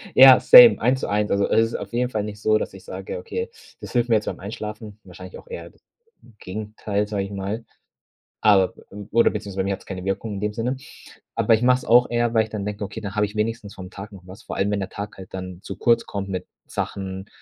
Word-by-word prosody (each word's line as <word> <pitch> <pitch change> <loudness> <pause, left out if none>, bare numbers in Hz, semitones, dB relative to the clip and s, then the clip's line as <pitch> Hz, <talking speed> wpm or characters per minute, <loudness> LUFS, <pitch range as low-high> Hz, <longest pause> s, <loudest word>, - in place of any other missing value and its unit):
Ja, 130 -1 +10
same, 245 -2 +9
eins 130 +4 +1
zu - - -2
eins. 105 +1 0
Also, 100 0 +1
es 115 0 +4
ist 115 - -6
auf - - -6
jeden 125 +1 0
Fall 110 -4 -2
nicht 105 0 -7
so, 110 0 +3
dass - - -4
ich - - -12
sage: - - -6
„Okay, 460 0 -4 0.3
das - - -8
hilft 120 -1 +1
mir 115 - +5
jetzt 105 - 0
beim - - -4
Einschlafen“, 105 +1 -7
wahrscheinlich 475 - -11
auch - - -15
eher 480 0 -8
d - - -27 0.6
Gegenteil, 105 +1 -3
sage 105 -2 -2
ich 100 - -9
mal, 100 +3 -4 0.8
aber 95 -3 +4 0.4
oder 115 +2 +4
beziehungsweise, 100 -2 -6
bei - - -4
mir 100 - -1
hat's 95 - -7
keine 95 -2 -6
Wirkung 95 +2 -3
in 100 - -5
dem 105 +1 -1
Sinne. 120 +5 -2 0.6
Aber, 115 - +3
ich 110 - +1
mache 125 +1 +4
es - - -11
auch 120 +1 +5
eher, 120 -1 +1
weil 110 -1 +4
ich 110 - -12
dann 105 -2 -4
denke: 105 0 -4
„Okay, 100 - -7
dann 100 -1 -6
habe 105 0 +3
ich 105 - -12
wenigstens 105 -1 -2
vom 90 -1 -9
Tag 100 +2 -9
noch 95 -2 -13
was“, 95 +5 -12
vor - - -6
allem, 100 +1 +1
wenn 105 -1 -1
der 95 - -4
Tag 100 +1 -7
halt 95 -1 -12
dann 90 -1 -6
zu - - -7
kurz 115 -1 +2
kommt 100 -1 -5
mit 95 -1 -4 0.2
Sachen, 95 0 -5
105 Hz, 250 wpm, -23 LUFS, 100-115 Hz, 0.8 s, Ja